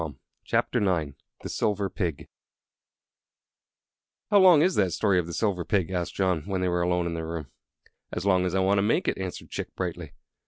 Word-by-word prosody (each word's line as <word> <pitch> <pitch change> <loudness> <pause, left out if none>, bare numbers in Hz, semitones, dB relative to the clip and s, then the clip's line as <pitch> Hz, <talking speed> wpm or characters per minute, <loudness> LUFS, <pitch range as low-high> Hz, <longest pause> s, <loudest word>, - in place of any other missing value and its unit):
The 90 -5 +1 0.4
Silver 100 -1 -1
Pig 85 -6 -4 2.0
"How 205 - +7
long 180 -5 +7
is 185 +2 +3
that 95 - +1
story 100 -2 +2
of 85 - -3
the - - -6
Silver 100 -5 0
Pig?" 95 -1 0
asked 90 -2 -3
John, 95 -4 +1
when 95 -2 -1
they 90 - +1
were 90 0 0
alone 90 0 +1
in 85 - -2
their 80 -1 -4
room. 80 -5 -6 0.6
"As - - -4
long 90 -2 +3
as 90 - -2
I 95 - +2
want 100 +1 +3
to - - +3
make 105 +3 +1
it," - - 0
answered 95 -2 -6
Chick, - - -5
brightly. - - -4
95 Hz, 185 wpm, -26 LUFS, 85-100 Hz, 2.0 s, How